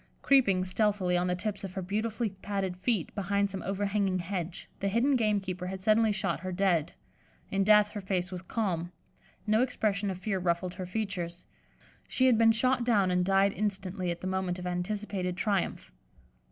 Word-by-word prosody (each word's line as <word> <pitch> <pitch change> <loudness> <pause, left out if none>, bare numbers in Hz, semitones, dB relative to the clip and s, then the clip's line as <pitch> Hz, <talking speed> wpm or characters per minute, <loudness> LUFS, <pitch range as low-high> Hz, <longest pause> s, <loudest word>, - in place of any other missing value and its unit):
Creeping, 200 -10 +4
stealthily, 190 -1 +1
on 175 +1 +1
the 180 - +1
tips 205 +3 -3
of 190 -2 -6
her 190 - -3
beautifully 215 +3 -2
padded 195 -1 -3
feet, 190 -1 -1
behind 200 0 0
some 190 -1 -5
overhanging 195 0 0
hedge, 175 -1 -4
the 200 - -1
hidden 235 +7 +2
gamekeeper 195 -6 0
had 190 +1 -5
suddenly 215 +3 +3
shot 195 -1 -1
her 185 0 -5
dead. 175 -4 +1 0.6
In 195 0 +2
death 210 0 +5
her 205 - -5
face 185 -1 -1
was 180 -1 -5
calm; 180 -4 -2 0.5
no 215 +1 +3
expression 210 -5 0
of 190 - -3
fear 195 0 -2
ruffled 175 0 -1
her 185 0 -6
features; 180 -4 -4 0.6
she 260 - +2
had 245 -4 +5
been 225 0 +6
shot 255 +2 +2
down 205 -6 +3
and 180 0 +2
died 195 +1 +3
instantly 195 -3 -2
at 170 0 -3
the - - -6
moment 185 -1 -1
of 180 - -7
anticipated 180 0 -2
triumph. 195 - -1
195 Hz, 180 wpm, -29 LUFS, 180-210 Hz, 0.6 s, been